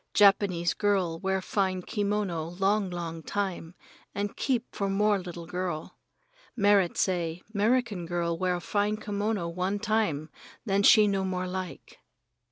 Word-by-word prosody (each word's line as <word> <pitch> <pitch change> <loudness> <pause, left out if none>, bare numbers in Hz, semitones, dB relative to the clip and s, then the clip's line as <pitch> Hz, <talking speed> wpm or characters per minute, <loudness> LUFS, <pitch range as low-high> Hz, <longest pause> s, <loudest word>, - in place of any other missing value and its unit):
Japanese 195 -4 +4
girl 190 -6 0
wear 190 0 -1
fine 185 -2 0
kimono 200 -6 -1
long, 195 0 +2
long 170 -2 -5
time, 185 -2 -3 0.4
and 205 0 -2
keep 250 -3 -1
for 200 -2 -1
more 205 +1 +2
little 175 -2 -7
girl. 180 -2 -4 0.6
Merrit 200 -5 +3
San - - +4 0.3
say 175 - -17
'Merican 215 -4 +1
girl 170 -1 -1
wear 180 +1 0
fine 205 +3 0
kimono 205 -3 -2
one 185 +4 -1
time, 205 -8 0 0.3
then 200 -2 +2
she 215 0 +7
no 195 -1 0
more 185 -1 -2
like. 185 -1 -6
195 Hz, 140 wpm, -28 LUFS, 175-205 Hz, 0.6 s, she